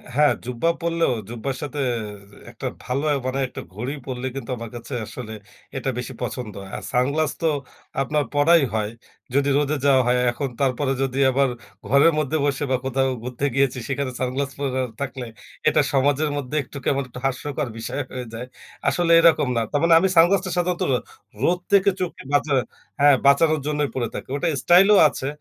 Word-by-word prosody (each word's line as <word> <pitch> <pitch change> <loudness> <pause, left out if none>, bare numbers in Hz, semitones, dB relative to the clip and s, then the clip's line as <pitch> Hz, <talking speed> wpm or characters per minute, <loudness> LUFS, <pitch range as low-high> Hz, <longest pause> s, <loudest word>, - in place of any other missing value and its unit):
হ্যাঁ, 150 +1 +5
জুব্বা 125 +6 0
পরলেও, 170 -4 +1 0.2
জুব্বার 120 +3 -4
সাথে 145 0 -5 0.5
যে - - -17 0.2
একটা - - -5
ভালো 130 +4 -2
অ্যা 145 - +2
মানে 130 +1 -1
একটা - - -8
ঘড়ি 120 +8 -4
পড়লে 130 -1 -5
কিন্তু 130 -2 -5
আমার 115 -1 -7
কাছে 120 +3 -8
আসলে 110 -1 -8 0.4
এটা 135 0 -2
বেশি 125 +2 -5
পছন্দ 120 -5 -4
হয়। 95 - -10
আর 105 - -8
সানগ্লাস 140 +5 +1
তো 165 - +2 0.5
আপনার 150 +3 0
পড়াই 160 +3 +5
হয়। 105 -1 0 0.5
যদি 140 0 +3
রোদে 145 +1 +1
যাওয়া 135 -2 +5
হয় 125 0 +3
এখন। 135 +3 -3
তারপরে 135 +1 +1
যদি 135 -1 -2
আবার 135 +1 +2 0.4
ঘরের 140 +5 +5
মধ্যে 155 +1 0
বসে 140 0 0
বা 130 - +3
কোথাও 135 0 +1
ঘুরতে 125 +2 -3
গিয়েছি 135 -2 +2
সেখানে 140 -1 -2
সানগ্লাস 130 +2 -1
পরা 130 -2 -1 0.2
থাকলে, 130 -2 -4 0.4
এটা - - +4
সমাজের 145 +2 +2
মধ্যে 140 +1 -4
একটু 140 - -11
কেমন 140 0 +1
একটু 125 - -9
হাস্যকর 140 +2 -2
বিষয় 115 +5 -3
হয়ে 125 -1 -5
যায়। 120 +3 -6 0.4
আসলে 175 -1 +2
এরকম 165 -4 +5
না। 115 - +2
তার 145 - +1
মানে 170 0 +5
আমি 190 - +3
সানগ্লাসটা 185 +3 +4
সাধারণত 175 0 0 0.6
রোদ 175 +4 +2
থেকে 200 0 +5
চোখকে 180 -2 -4
বাঁচা 145 0 +2 0.5
হ্যাঁ 145 0 +7
বাঁচানোর 155 +3 +5
জন্যই 150 -1 0
পড়ে 120 -2 -1
থাকি। - - -6
ওটা 145 - -1 0.2
স্টাইলও 195 +4 +6
আছে 135 -1 -4
140 Hz, 180 wpm, -23 LUFS, 125-150 Hz, 0.6 s, হ্যাঁ